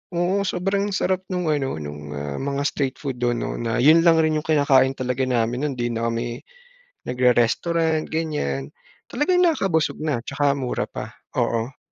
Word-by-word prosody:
Oo 175 +3 +1
sobrang 195 +3 0
sarap 185 0 0
nung 180 -2 -2
ano, 135 - -1
nung 75 -1 -7
ah, 70 0 -4
mga 140 0 -2
street 135 -3 -1
food 135 -4 -5
dun 120 -1 +1
'no - - -4
na 115 0 -1
yun 160 +3 +7
lang 165 -1 +5
rin 155 0 +2
yung - - -14
kinakain 135 -3 +4
talaga 125 0 -2
namin 120 +1 0
nun 145 - -1
hindi 120 0 -1
na 115 +1 -1
kami 120 +1 -3 0.6
nagre-restaurant 155 +7 +1
ganiyan, 75 - -2 0.4
talagang 360 +8 +2
nakakabusog 195 - +1
na 150 -6 0
tsaka 140 +1 +1
mura 130 -3 -2
pa, - - -7 0.2
oo. 115 +4 -1
140 Hz, 165 wpm, -23 LUFS, 120-160 Hz, 0.6 s, yun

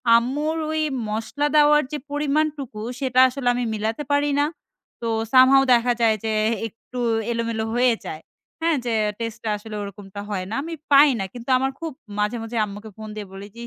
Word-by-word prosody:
আম্মুর 290 +7 +1 0.2
ওই 315 - 0 0.3
মসলা 225 +7 -1
দেওয়ার 300 0 +6
যে 300 - -2
পরিমাণটুকু 290 -5 -1 0.2
সেটা 255 -2 +1
আসলে 255 0 -4
আমি 245 - -1
মিলাতে 220 +6 -2
পারি 285 0 +2
না। 290 - +4 0.6
তো 230 - -2 0.2
some 260 0 +7
how 270 - +7
দেখা 245 +1 +3
যায় 225 -1 +4
যে 220 - -1 0.4
একটু 230 +3 -10 0.3
এলোমেলো 230 -1 -1
হয়ে 245 0 +4
যায়। 155 - -6 0.4
হ্যাঁ, 325 -2 +2
যে 235 - 0 0.3
টেস্ট 230 -1 -4
টা 220 - -2
আসলে 215 +1 -9
ওরকমটা 200 0 -8
হয় 185 -3 -2
না। 225 - -3
আমি 330 - -6 0.2
পাই 285 +1 +8
না। 195 - -1
কিন্তু 240 +1 -9
আমার 265 +1 0
খুব 330 -1 -4 0.3
মাঝে, 210 +3 0
মাঝে 230 +1 -5
আম্মুকে 205 +2 -9
ফোন 215 0 -8
দিয়ে 210 -2 -6
বলি 195 +1 -8
যে, - - -11
240 Hz, 190 wpm, -23 LUFS, 220-285 Hz, 0.6 s, পাই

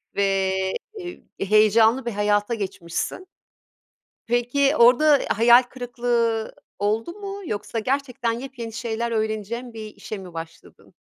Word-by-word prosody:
ve, 195 -1 +1 0.5
eee, 355 -2 -8 0.2
heyecanlı 220 +4 +4
bir 235 - -2
hayata 205 +2 +1
geçmişsin. 195 - -4 1.0
Peki, 245 +5 +2
orda 275 +4 +6
hayal 235 +3 +6
kırıklığı 240 -3 -1 0.3
oldu 215 +9 0
mu 400 0 -7
yoksa 215 -1 -3
gerçekten 255 -1 -1
yepyeni 235 -2 -6
şeyler 230 0 -3
öğreneceğin 220 +2 -3
bir 215 -1 -8
işe 215 - -7
mi 185 -3 -10
başladın? 165 0 -10
230 Hz, 115 wpm, -23 LUFS, 215-250 Hz, 1.0 s, orda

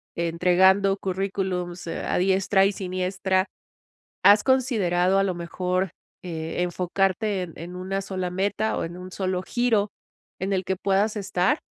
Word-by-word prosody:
entregando 180 +4 +3
currículums, 185 -2 -3
eh, - - -4
a - - 0
diestra 190 +1 +3
y - - 0
siniestra, 185 0 -1 0.8
has 205 +1 +7
considerado, 195 -9 +2
a 195 - +3
lo 185 -2 -1
mejor, 180 +1 -2 0.3
e 165 0 -4
enfocarte 190 +3 0
en 165 - -8
en 175 +2 -8
una 190 +2 -3
sola 185 -2 -3
meta 200 +4 0
o - - -1
en 170 - -7
un 185 0 -9
solo 185 -1 -2
giro 230 -4 +1 0.5
en 195 +1 -1
el 185 - 0
que 190 +1 -2
puedas 200 +3 +1
estar? 195 - +1
190 Hz, 150 wpm, -25 LUFS, 180-195 Hz, 0.8 s, has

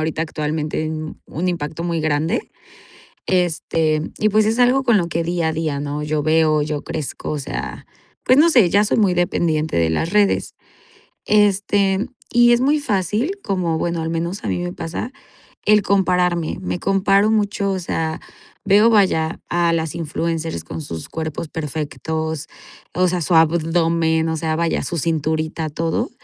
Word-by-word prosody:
ahorita 160 0 -1
actualmente, 155 0 -2 0.4
un 180 +4 -3
impacto 165 -1 -3
muy 170 -2 -1
grande, 155 +1 -1 0.8
este, 165 -3 +1 0.2
y 215 - +3
pues, 215 +1 +3
es 225 +2 0
algo 255 +2 +4
con 235 -5 +4
lo 170 -2 -1
que 170 0 -1
día 170 -1 0
a - - -1
día 155 -3 -2
no 145 +1 -3
yo 150 0 -1
veo 155 -1 +3
yo 150 -1 -3
crezco, 155 -4 -5
o 150 - -2
sea, 140 - -6 0.4
pues, 255 - +5
no 320 +3 +6
sé, 240 - +5
ya 205 +3 +4
soy 210 - +1
muy 200 -5 +3
dependiente 165 - 0
de 80 -1 +2
las 160 - -1
redes, 205 -1 +2 0.7
este, 200 0 +2 0.2
y 240 0 +5
es 240 - +3
muy 290 +3 +2
fácil 210 - 0
como 180 -5 -1
bueno, 170 0 -2
al 160 - -3
menos 170 +4 -3
a - - -2
mí - - -1
me 175 0 -3
pasa 170 +9 -5 0.5
el 210 0 +5
compararme, 180 -4 +1
me 180 -1 -3
comparo 195 +2 +2
mucho, 205 -2 0
o 190 - -1
sea, 160 -2 -3 0.4
veo 205 +3 +5
vaya, 185 -7 +2
a 170 -1 +1
las 160 -2 -1
influencers 165 - -3
con 80 0 -6
sus 80 0 -7
cuerpos 160 0 -5
perfectos, 160 +1 -4 0.5
o 185 +1 +2
sea, 180 0 -1
su 165 +2 0
abdomen, 165 0 +2
o 160 - -1
sea, 160 0 -1
vaya 165 0 0
su 170 - -3
cinturita, 160 0 -1
todo, 165 - -2
165 Hz, 165 wpm, -20 LUFS, 155-195 Hz, 0.8 s, no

